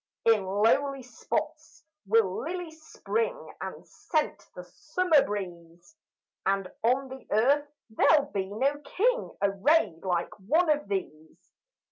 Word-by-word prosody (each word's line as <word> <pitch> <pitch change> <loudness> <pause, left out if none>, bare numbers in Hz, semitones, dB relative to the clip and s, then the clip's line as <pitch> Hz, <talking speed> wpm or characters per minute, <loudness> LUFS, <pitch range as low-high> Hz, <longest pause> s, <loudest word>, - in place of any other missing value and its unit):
In 225 -3 +4
lowly 240 +8 +1
spots 250 +4 -5 0.2
will 205 -3 +2
lilies 330 -1 -6
spring 480 +2 -3
And - - -7
scent 300 - -3
the 180 - -7
summer 310 - +2
breeze, 175 - -7 0.5
And 195 -1 0
on 260 +4 +2
the 265 0 -10
earth 280 +7 +2 0.2
there'll 285 +5 +3
be 190 -1 -2
no 270 +8 0
king - - -1
Arrayed 200 - +2
like 175 -2 -1
one 310 - +2
of 295 -4 0
these. 160 -6 -6
245 Hz, 120 wpm, -28 LUFS, 195-305 Hz, 0.5 s, In